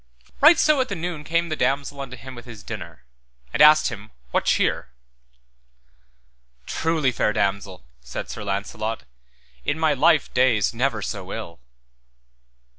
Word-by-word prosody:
Right 310 +4 +8
so 300 -3 +4
at 255 - -2
the 200 - -2
noon 170 -3 -4
came 170 +2 0
the 155 - -1
damosel 140 0 -1
unto 130 -2 -7
him 130 +3 -10
with 120 0 -11
his 110 -4 -11
dinner, 85 - -8 0.5
and - - +1
asked 150 0 +7
him 110 -2 -9 0.2
what - - +1
cheer. - - +1 1.8
Truly, 160 -5 0
fair 110 -2 0
damosel, 95 -7 -2
said - - -7
Sir - - -7
Launcelot, 105 +1 -3 0.6
in 145 - -1
my 160 -2 +2
life 155 +2 +3
days 125 -5 +3
never 115 -3 -1
so 95 -2 -5
ill. 95 -7 -7
125 Hz, 145 wpm, -23 LUFS, 105-155 Hz, 1.8 s, Right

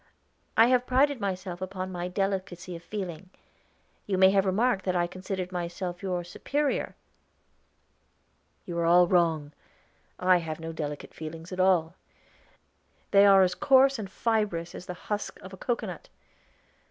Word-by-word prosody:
"I 225 - +8
have 250 -1 +2
prided 270 0 +2
myself 185 -2 -4
upon 185 0 -4
my 175 -1 -4
delicacy 185 -1 -3
of 165 - -9
feeling. 185 -2 -6 0.8
You 195 -2 0
may 190 0 +6
have 195 0 +2
remarked 205 +1 +1
that 185 -1 0
I 175 -1 +2
considered 185 +1 -5
myself 175 0 -4
your 180 -3 -2
superior?" 280 +11 -2 1.7
"You 170 -1 -4
are 170 - +1
all 175 +1 +6
wrong. 165 -5 +2 0.7
I 185 0 +4
have 160 -2 -5
no 165 0 -6
delicate 150 -2 -5
feelings 160 +2 -8
at 185 - -6
all; 180 -3 +3 1.2
they 200 0 +7
are 195 -1 +7
as 180 -1 +1
coarse 270 0 +4
and 200 -3 -5
fibrous 205 -6 -1
as 180 - -9
the 180 - -5
husk 210 -1 -4
of 190 - -11
a - - -9
cocoanut. 240 +5 -4
185 Hz, 150 wpm, -28 LUFS, 175-200 Hz, 1.7 s, I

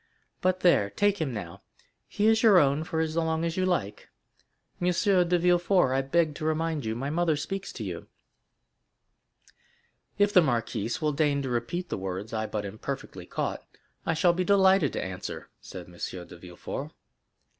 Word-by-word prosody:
But 185 0 +1
there—now 105 - +3
take 205 -2 +2
him—he 105 - -6
is 220 0 +4
your 215 -5 +6
own 145 -1 +3
for 160 0 -2
as 160 -1 -2
long 160 0 0
as 165 0 -2
you 185 0 +1
like. 105 - -2 0.7
M. 180 0 +2
Villefort, 180 - +3
I 135 - +2
beg 155 +3 +1
to 150 - -8
remind 160 -2 -1
you 110 0 -2
my 135 +4 -3
mother 165 -1 +1
speaks 195 +6 -4
to 115 - -6
you." 90 -4 -6 2.1
"If 205 0 +3
the 185 - +8
marquise 120 -2 -1
will 150 -1 +1
deign 140 -1 +1
to 135 - -3
repeat 125 +10 -2
the - - -3
words 95 +3 -5
I 110 0 -1
but 105 -1 -3
imperfectly 100 -3 -6
caught, - - -3 0.4
I 165 - 0
shall 170 +2 +4
be 185 +1 0
delighted 190 -5 +4
to - - -2
answer," 95 -1 -7
said 90 -2 -9
M. - - -16
de 90 -2 -6
Villefort. 85 0 -7
155 Hz, 165 wpm, -27 LUFS, 115-180 Hz, 2.1 s, the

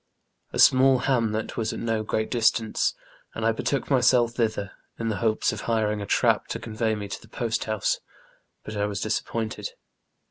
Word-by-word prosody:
A - - -4
small 130 0 +6
bamlet 115 -5 0
w^as 115 -2 -2
at - - -5
no 115 -1 0
great 110 0 -2
distance, 115 -2 +2 0.4
and 110 - -2
I 115 - +4
betook 135 +5 -2
myself 125 -2 +4
tbitber, 110 -4 -1 0.3
in 115 0 -2
tbe 105 -4 -2
bopes 110 -1 +1
of - - -5
biring 105 -2 0
a 100 - -5
trap - - +2
to - - -4
convey 110 0 -1
me 105 -1 -5
to 95 - -6
tbe - - -30
postbouse, 110 -3 -1 0.7
but 110 - -6
I 105 0 0
was 100 -1 -3
disappointed. 110 - -3
110 Hz, 175 wpm, -26 LUFS, 110-120 Hz, 0.7 s, small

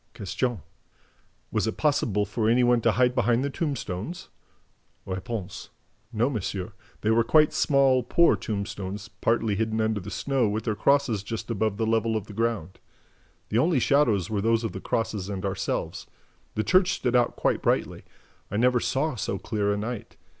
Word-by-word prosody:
Q. 110 +2 -2 0.9
"Was - - 0
it - - -3
possible 115 -9 +1
for 110 +2 0
any 125 +2 +4
one 120 -1 +4
to 115 -1 +3
hide 125 +1 +3
behind 120 0 +2
the 140 - -2
tombstones?" 150 - -4 0.8
R. 95 0 -4 0.9
"No, 115 +1 +1
monsieur. 100 -7 -3 0.3
They 110 - +1
were 115 +1 +4
quite 155 +4 +4
small, 135 -2 +3
poor 170 +8 +4
tombstones, 100 0 -5
partly 110 0 0
hidden 110 +1 -1
under 110 -1 +1
the 95 - -8
snow, 130 -1 0
with 105 +1 -2
their 110 - 0
crosses 135 -1 +2
just 115 +3 -5
above 110 -2 0
the 110 - 0
level 115 0 +1
of 105 - -5
the 105 - -11
ground. 110 -5 -2 0.7
The 110 - +2
only 160 +3 +3
shadows 115 - +2
were 105 -2 -1
those 115 +2 +2
of 115 - -2
the 95 - -7
crosses 105 -4 -2
and 100 -1 -4
ourselves. 95 -1 -3 0.5
The 110 - 0
church 185 - +4
stood 125 0 -1
out 120 -1 +3
quite - - 0
brightly. - - 0 0.5
I 105 - -2
never 125 +2 +3
saw 140 +6 0
so 100 -4 -3
clear 105 +1 -1
a 100 - 0
night. 115 +2 -5
110 Hz, 175 wpm, -26 LUFS, 105-125 Hz, 0.9 s, any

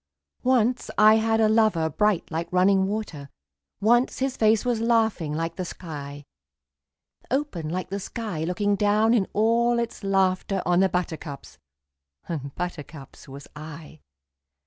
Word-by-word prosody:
Once 250 -1 +1
I 215 +1 +7
had 225 0 +1
a 220 - +4
lover 215 -7 +3
bright 210 +3 0
like 165 +1 -4
running 190 +1 +3
water, 195 -9 -5 0.5
Once 240 +5 +2
his 265 0 -1
face 220 -1 +2
was 240 -3 0
laughing 225 -9 +1
like 165 +2 -3
the 185 - -2
sky; 145 -5 -8 1.0
Open 250 - -2
like 185 +3 -4
the 200 - -2
sky 200 -5 -5
looking 200 +4 0
down 210 +3 +3
in 210 -6 +2
all 235 +3 +2
its 235 -2 -4
laughter 195 0 +1
On 175 +1 +3
the 190 0 +4
buttercups 160 -5 -5 0.7
and 140 -5 -5
buttercups 155 -5 -7
was 140 +1 -10
I. 155 0 -10
195 Hz, 140 wpm, -25 LUFS, 165-220 Hz, 1.0 s, I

